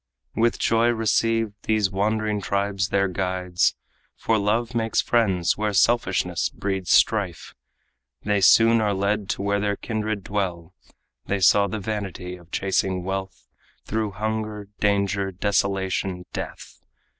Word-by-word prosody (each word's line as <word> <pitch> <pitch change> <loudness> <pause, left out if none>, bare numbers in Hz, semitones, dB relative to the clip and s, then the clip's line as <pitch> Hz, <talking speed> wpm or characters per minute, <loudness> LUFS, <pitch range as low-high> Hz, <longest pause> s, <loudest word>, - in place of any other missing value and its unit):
With 115 +1 +2
joy 115 +1 +2
received, 115 -1 +1
these 105 -3 +2
wandering 105 +1 0
tribes 100 -1 -1
their 100 0 +2
guides 90 -1 0 0.4
For 115 -1 0
love 115 +4 0
makes 115 -1 0
friends 100 -7 +1
where 105 -1 0
selfishness 115 +5 +2
breeds 95 -2 -4
strife 100 -6 +2 0.7
They 105 -1 +1
soon 115 +3 +6
are 105 -2 +1
led 100 +1 -1
to - - -2
where 100 0 +1
their 100 0 0
kindred 110 -2 -3
dwell. 90 -4 -3 0.5
They 100 - 0
saw 100 +2 +5
the 110 - -4
vanity 100 -4 -5
of 85 -2 -17
chasing 95 -1 0
wealth 95 -1 -5 0.4
Through 110 -2 -2
hunger, 105 0 -4
danger, 100 -1 +1
desolation, 95 -1 -1
death. - - -7
100 Hz, 130 wpm, -24 LUFS, 95-110 Hz, 0.7 s, soon